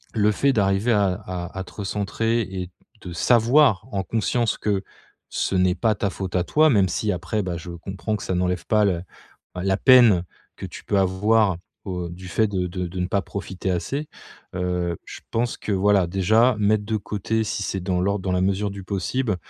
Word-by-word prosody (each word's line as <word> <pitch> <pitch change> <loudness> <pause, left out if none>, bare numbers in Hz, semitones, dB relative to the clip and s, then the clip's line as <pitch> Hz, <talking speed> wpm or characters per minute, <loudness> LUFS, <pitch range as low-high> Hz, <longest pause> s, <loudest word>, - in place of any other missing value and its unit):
le 105 -1 +3
fait 140 +6 +2
d'arriver 100 +2 +2
à 100 -3 +2
à 90 -2 -6
à - - -2
te - - -14
recentrer 105 +3 -1
et 95 -3 -5 0.3
de 90 - -7
savoir, 120 - +4
en 95 -1 -1
conscience, 115 +2 0
que 100 -2 -1 0.5
ce - - -1
n'est 90 -1 +3
pas 110 +4 +2
ta 100 +1 -1
faute 95 -1 -5
à 90 - +2
toi, 155 +1 +4
même 100 -7 +4
si 105 +5 -1
après, 100 +4 -2
bah, 90 -2 -3
je 85 +1 -8
comprends 95 +5 -4
que 100 - -9
ça 95 - -2
n'enlève 90 -1 -1
pas 105 -1 +3
le, 100 - +3
heu, - - -9 0.5
la 95 +1 0
peine 120 -8 +6 0.3
que - - -6
tu - - -10
peux 100 - +1
avoir 95 0 +2 0.3
au 90 -2 -3
du 90 +2 -9
fait 110 +3 +2
de 95 -3 -1
de 90 0 -4
de 90 +1 -6
ne 90 - 0
pas 100 +1 0
profiter 95 -1 -4
assez. 135 - -2 0.5
Heu, 90 -2 -1
je - - -9
pense 115 +1 -1
que, 105 - -4
voilà, 95 -2 +3
déjà 110 +7 +3
mettre 105 0 +2
de 110 0 -1
côté, 105 +2 -2
si 105 - -3
c'est 95 -1 -3
dans 90 -1 -1
l'ordre 100 +1 0
dans 95 - -1
la 90 - +2
mesure 100 +2 0
du 100 -1 -8
possible, 105 +3 -1
100 Hz, 205 wpm, -23 LUFS, 90-110 Hz, 0.5 s, peine